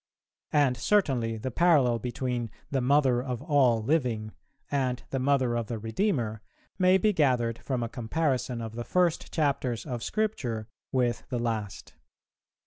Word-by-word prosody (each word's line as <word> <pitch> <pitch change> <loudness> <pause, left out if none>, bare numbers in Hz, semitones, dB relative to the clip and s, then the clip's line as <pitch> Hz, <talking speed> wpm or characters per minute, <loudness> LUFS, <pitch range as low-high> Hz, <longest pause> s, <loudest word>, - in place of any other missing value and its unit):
And 140 -4 +3
certainly 125 - +1
the 130 +4 -4
parallel 140 -7 +4
between 125 -1 -3 0.2
"the 135 -2 +1
Mother 130 -2 +3
of 125 -2 -4
all 125 -7 +3
living" 120 -6 0 0.4
and 130 -3 0
the 135 - -1
Mother 130 -2 +2
of 115 -2 -2
the 115 - -3
Redeemer 115 - -1 0.4
may 185 0 +5
be 210 +2 +2
gathered 125 - +1
from 130 -3 -2
a - - -1
comparison 125 0 -1
of 110 -1 -6
the 120 +1 -4
first 175 +3 +1
chapters 140 -6 0
of 125 -5 -4
Scripture 125 - -2 0.2
with 125 -2 0
the 125 - -1
last. 110 -4 -3
125 Hz, 145 wpm, -28 LUFS, 115-145 Hz, 0.4 s, may